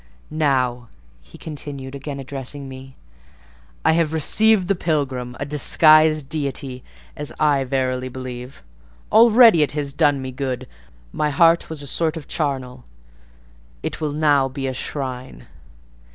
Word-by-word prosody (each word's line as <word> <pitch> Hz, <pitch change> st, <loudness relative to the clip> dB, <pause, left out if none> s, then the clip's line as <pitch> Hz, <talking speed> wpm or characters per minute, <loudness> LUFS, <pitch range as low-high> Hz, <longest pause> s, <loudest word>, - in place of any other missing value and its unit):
"Now," 130 Hz, -6 st, 0 dB, 0.3 s
he -, -, -16 dB
continued, 140 Hz, -3 st, -7 dB
again 140 Hz, 0 st, -6 dB
addressing 135 Hz, +1 st, -7 dB
me, 130 Hz, 0 st, -11 dB, 0.9 s
"I -, -, +5 dB
have 160 Hz, -1 st, +1 dB
received 195 Hz, +5 st, +3 dB
the 200 Hz, -, +2 dB
pilgrim—a 135 Hz, -7 st, -3 dB
disguised 155 Hz, +1 st, +4 dB
deity, 140 Hz, -3 st, -3 dB, 0.3 s
as 150 Hz, 0 st, -4 dB
I 145 Hz, -3 st, +2 dB
verily 130 Hz, -1 st, -2 dB
believe. 125 Hz, 0 st, -8 dB, 0.5 s
Already 225 Hz, -4 st, +7 dB
it 150 Hz, -, +1 dB
has 145 Hz, -2 st, -3 dB
done 145 Hz, -2 st, +2 dB
me 130 Hz, 0 st, -6 dB
good: 130 Hz, -1 st, -4 dB, 0.5 s
my 150 Hz, -, 0 dB
heart 165 Hz, +3 st, +3 dB
was 155 Hz, -2 st, -5 dB
a -, -, -7 dB
sort 160 Hz, +3 st, -1 dB
of 155 Hz, -, -9 dB
charnel; 130 Hz, -5 st, -3 dB, 1.0 s
it -, -, -4 dB
will 150 Hz, -2 st, -2 dB
now 145 Hz, -3 st, +2 dB
be 135 Hz, +1 st, -5 dB
a 130 Hz, -, -2 dB
shrine." 130 Hz, -1 st, -6 dB
140 Hz, 135 wpm, -21 LUFS, 130-155 Hz, 1.0 s, Already